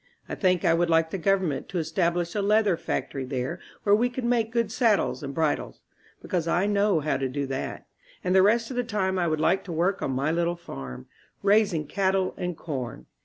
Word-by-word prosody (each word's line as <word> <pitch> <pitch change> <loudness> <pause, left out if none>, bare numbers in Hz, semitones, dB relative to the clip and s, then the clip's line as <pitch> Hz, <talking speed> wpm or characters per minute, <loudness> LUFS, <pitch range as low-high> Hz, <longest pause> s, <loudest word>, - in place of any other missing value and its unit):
I - - -6
think 180 -3 +1
I 165 - +5
would 170 +1 +2
like 165 0 +3
the 195 - -3
government 180 -7 0
to 185 - -3
establish 170 +1 0
a 210 - 0
leather 210 -1 +3
fac - - -3
tory 135 - -4
there 130 -1 -3 0.2
where 205 - +4
we 235 +4 +3
could 245 +1 -5
make 235 -2 +1
good 230 -2 0
saddles 225 -7 +2
and 140 -2 -5
bri 155 +1 +2
dles, - - -9 0.5
because 170 -3 -1
I 175 +3 +2
know 205 -4 +2
how 145 -2 0
to 135 -1 -2
do 140 +2 -2
that; 135 0 -4 0.4
and 180 - +1
the 190 - +6
rest 225 +5 +3
of - - -5
the 245 - +1
time 190 -5 -1
I 175 - +1
would 155 -1 0
like 185 +5 +2
to 185 - -6
work 175 +4 0
on - - -1
my 135 +4 0
little 170 +1 0
farm, 65 - -8 0.4
raising 200 -6 +3
cattle 190 +1 0
and 180 -2 -4
corn. 125 - -5
175 Hz, 220 wpm, -26 LUFS, 155-200 Hz, 0.5 s, the